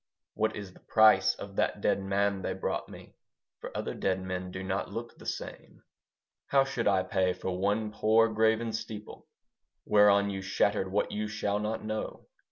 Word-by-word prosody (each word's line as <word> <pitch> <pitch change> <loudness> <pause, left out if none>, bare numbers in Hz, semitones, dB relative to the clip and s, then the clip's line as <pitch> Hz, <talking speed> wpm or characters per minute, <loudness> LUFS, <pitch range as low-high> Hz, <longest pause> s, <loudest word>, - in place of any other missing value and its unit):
What 110 0 0
is 100 -3 -7
the - - -18
price 95 -4 +5
of 100 -1 -9
that - - +1
dead - - +1
man 100 0 0
they 95 - -2
brought 95 - -3
me? - - -12 0.5
For - - -7
other - - -3
dead 95 -1 0
men 90 0 -4
do 95 +1 -6
not 95 +1 -2
look 120 +1 -6
the - - -12
same. - - -7 0.6
How 135 -1 +4
should 130 -4 -2
I 95 -2 +3
pay 95 0 +1
for 90 0 -4
one 105 +3 0
poor 110 +1 +4
graven 110 +1 +1
steeple 110 -1 -7 0.6
Whereon 100 -1 +5
you 95 -1 -4
shattered 95 0 0
what 105 - 0
you 105 0 -2
shall 105 -1 -1
not 110 +1 -3
know? 110 0 -4
100 Hz, 175 wpm, -29 LUFS, 95-110 Hz, 0.6 s, price